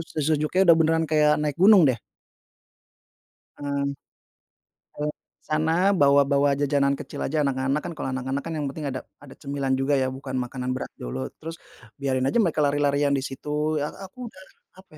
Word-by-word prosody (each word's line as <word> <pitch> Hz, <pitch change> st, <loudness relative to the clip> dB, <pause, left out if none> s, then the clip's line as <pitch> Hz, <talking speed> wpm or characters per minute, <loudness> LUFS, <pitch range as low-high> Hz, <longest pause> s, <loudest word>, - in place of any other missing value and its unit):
se 160 Hz, -2 st, -4 dB
sejuknya 155 Hz, +5 st, +2 dB
udah -, -, +5 dB
beneran 160 Hz, 0 st, +3 dB
kayak 150 Hz, -1 st, +3 dB
naik 150 Hz, +1 st, -2 dB
gunung 195 Hz, -2 st, +8 dB
deh. 130 Hz, -6 st, +2 dB, 1.6 s
Mmm. 140 Hz, -1 st, -2 dB, 1.1 s
Eee, 150 Hz, 0 st, -2 dB, 0.3 s
sana 160 Hz, +5 st, +2 dB
bawa-bawa 140 Hz, 0 st, +4 dB
jajanan 140 Hz, -1 st, +2 dB
kecil -, -, -8 dB
aja, 150 Hz, +1 st, 0 dB
anak-anak 135 Hz, +1 st, 0 dB
kan, -, -, -5 dB
kalau 135 Hz, -, -4 dB
anak-anak 130 Hz, +2 st, -2 dB
kan 165 Hz, -, -4 dB
yang 150 Hz, -2 st, -2 dB
penting 150 Hz, +1 st, -5 dB
ada 130 Hz, -1 st, -4 dB, 0.2 s
ada 145 Hz, -2 st, -14 dB
cemilan 140 Hz, -1 st, -2 dB
juga 135 Hz, +2 st, 0 dB
ya, 130 Hz, -, +1 dB
bukan 130 Hz, 0 st, -6 dB
makanan 125 Hz, +1 st, -4 dB
berat 130 Hz, -, -5 dB
dulu, 65 Hz, +2 st, -5 dB
terus 165 Hz, +1 st, -7 dB, 0.4 s
biarin 130 Hz, -2 st, 0 dB
aja 235 Hz, -, +1 dB
mereka 165 Hz, -7 st, +2 dB
lari-larian 145 Hz, 0 st, +2 dB
di 140 Hz, -, +2 dB
situ 150 Hz, +3 st, -2 dB
ya, 145 Hz, -, -2 dB
aku 195 Hz, +5 st, -12 dB
udah, 185 Hz, -, -16 dB, 0.4 s
apa 190 Hz, -, -18 dB
145 Hz, 170 wpm, -25 LUFS, 135-155 Hz, 1.6 s, gunung